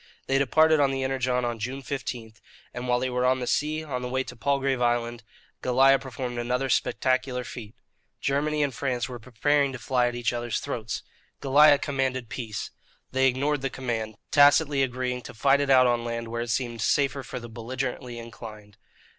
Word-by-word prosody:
They 135 Hz, 0 st, +2 dB
departed 155 Hz, +4 st, +4 dB
on 140 Hz, -1 st, +4 dB
the 135 Hz, 0 st, -2 dB
Energon 130 Hz, -2 st, 0 dB
on 120 Hz, -1 st, -3 dB
June 130 Hz, +5 st, -4 dB
15; 125 Hz, -4 st, -5 dB, 0.4 s
and 125 Hz, +1 st, -5 dB
while 125 Hz, 0 st, +2 dB
they 130 Hz, 0 st, -2 dB
were 125 Hz, 0 st, 0 dB
on 130 Hz, +1 st, +3 dB
the 125 Hz, -, -3 dB
sea, 155 Hz, +4 st, 0 dB
on 130 Hz, -5 st, -4 dB
the 125 Hz, -, -4 dB
way 130 Hz, +1 st, 0 dB
to 125 Hz, -, -10 dB
Palgrave 135 Hz, +1 st, 0 dB
Island, 120 Hz, 0 st, 0 dB, 0.4 s
Goliah 135 Hz, +2 st, +4 dB
performed 125 Hz, -2 st, -5 dB
another 125 Hz, +3 st, -1 dB
spectacular 130 Hz, 0 st, 0 dB
feat. 115 Hz, -2 st, -9 dB, 0.4 s
Germany 150 Hz, +2 st, 0 dB
and 140 Hz, -2 st, -1 dB
France 125 Hz, -2 st, -2 dB
were 125 Hz, -2 st, -7 dB
preparing 140 Hz, +5 st, +1 dB
to -, -, -5 dB
fly 125 Hz, 0 st, +1 dB
at 120 Hz, -, -3 dB
each 120 Hz, 0 st, -1 dB
other's 120 Hz, -1 st, -2 dB
throats. 115 Hz, -1 st, -4 dB, 0.4 s
Goliah 145 Hz, +2 st, +6 dB
commanded 130 Hz, -4 st, -2 dB
peace. 110 Hz, -5 st, -5 dB, 0.4 s
They 130 Hz, 0 st, +3 dB
ignored 140 Hz, +3 st, 0 dB
the 135 Hz, -, -1 dB
command, 115 Hz, -5 st, -4 dB
tacitly 145 Hz, 0 st, +5 dB
agreeing 125 Hz, -1 st, -1 dB
to -, -, -11 dB
fight 140 Hz, +4 st, +3 dB
it 140 Hz, -, -1 dB
out 130 Hz, -1 st, +7 dB
on 120 Hz, -1 st, +1 dB
land 115 Hz, -1 st, -4 dB
where 115 Hz, +1 st, -3 dB
it 120 Hz, -, -4 dB
seemed 120 Hz, -1 st, -2 dB
safer 140 Hz, +1 st, +1 dB
for 125 Hz, -, -6 dB
the 120 Hz, -, -9 dB
belligerently 125 Hz, +2 st, -5 dB
inclined. 110 Hz, -3 st, -10 dB
125 Hz, 190 wpm, -26 LUFS, 120-135 Hz, 0.4 s, out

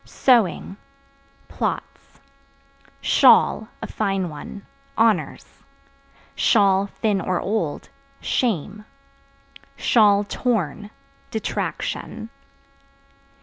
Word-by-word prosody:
Sewing 225 Hz, -6 st, +1 dB, 0.7 s
Plots. -, -, -5 dB, 0.8 s
Shawl -, -, +4 dB, 0.2 s
(A -, -, -2 dB
fine 195 Hz, -4 st, -2 dB
one) 175 Hz, +6 st, -9 dB, 0.3 s
honors; 220 Hz, -8 st, +1 dB, 0.9 s
(thin 200 Hz, 0 st, +2 dB
or 180 Hz, -2 st, -1 dB
old) 190 Hz, -8 st, -2 dB, 0.3 s
shame; 210 Hz, -, -2 dB, 1.4 s
(torn) 210 Hz, -, -2 dB, 0.4 s
detraction. 220 Hz, -, -4 dB
200 Hz, 60 wpm, -22 LUFS, 185-220 Hz, 1.4 s, Shawl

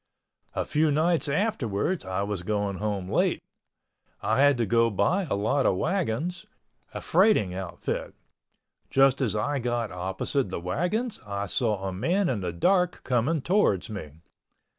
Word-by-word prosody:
A -, -, -1 dB
few 155 Hz, +1 st, +2 dB
nights 160 Hz, +1 st, +1 dB
afterwards 150 Hz, -, 0 dB
I 95 Hz, +1 st, -2 dB
was 100 Hz, -3 st, -3 dB
going 100 Hz, 0 st, -1 dB
home 100 Hz, -3 st, -2 dB
late. -, -, +2 dB, 0.8 s
I 110 Hz, +5 st, +1 dB
had 145 Hz, -2 st, +5 dB
to 120 Hz, -, +1 dB
go 115 Hz, +3 st, +3 dB
by 180 Hz, -, +1 dB
a -, -, +1 dB
lot 120 Hz, +8 st, +1 dB
of 90 Hz, -, +2 dB
wagons—a 175 Hz, -, -4 dB
freighting 175 Hz, -, +3 dB
outfit. 90 Hz, -2 st, -4 dB, 0.7 s
Just 135 Hz, 0 st, +4 dB
as 115 Hz, -5 st, 0 dB
I 140 Hz, +7 st, 0 dB
got 120 Hz, -2 st, -2 dB
opposite 95 Hz, +7 st, -2 dB
the 95 Hz, -, -4 dB
wagons 180 Hz, -, -2 dB
I 100 Hz, -1 st, -3 dB
saw 105 Hz, -1 st, -1 dB
a 95 Hz, -, -3 dB
man 175 Hz, -, +1 dB
in 115 Hz, -6 st, -1 dB
the 90 Hz, -2 st, -2 dB
dark 180 Hz, -, +1 dB
coming 130 Hz, +5 st, 0 dB
towards 170 Hz, -, +2 dB
me. 80 Hz, -9 st, -7 dB
115 Hz, 150 wpm, -27 LUFS, 100-160 Hz, 0.8 s, had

